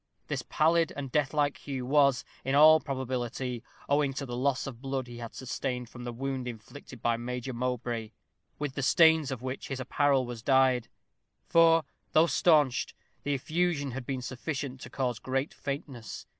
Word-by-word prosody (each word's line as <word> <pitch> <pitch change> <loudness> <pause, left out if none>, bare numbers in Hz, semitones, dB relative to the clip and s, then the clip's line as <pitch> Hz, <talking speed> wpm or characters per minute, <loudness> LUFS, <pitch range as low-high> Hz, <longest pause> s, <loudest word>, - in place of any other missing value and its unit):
This - - -1
pallid 165 +1 +2
and 135 -2 -5
deathlike 145 0 +1
hue 135 -3 -5
was, 140 -2 +3 0.2
in 135 +2 0
all 155 +2 +8
probability, 130 -3 -3 0.3
owing 145 -1 +2
to 140 +1 -4
the 120 -2 -5
loss 135 +2 0
of 125 -4 -8
blood 135 -1 -2
he 120 -1 -10
had 115 -1 -7
sustained 125 -2 -4
from 120 0 -9
the 120 - -3
wound 130 +1 -3
inflicted 120 +2 -10
by 115 -1 +2
Major 125 +2 -4
Mowbray, 120 -2 -2 0.5
with 145 -2 -3
the 135 - -3
stains 160 +1 +5
of 130 -3 -5
which 130 +1 -4
his 135 -1 -4
apparel 135 0 +2
was 120 -2 -7
dyed; 130 -2 +3 0.6
for, 165 -1 +5 0.3
though 155 - +6
staunched, 150 -7 +3 0.3
the 145 0 -1
effusion 155 0 0
had 125 0 -6
been 130 -2 -3
sufficient 130 0 -4
to - - -8
cause 125 -4 -2
great 135 +2 -2
faintness. 135 -5 -6
135 Hz, 170 wpm, -29 LUFS, 125-145 Hz, 0.6 s, all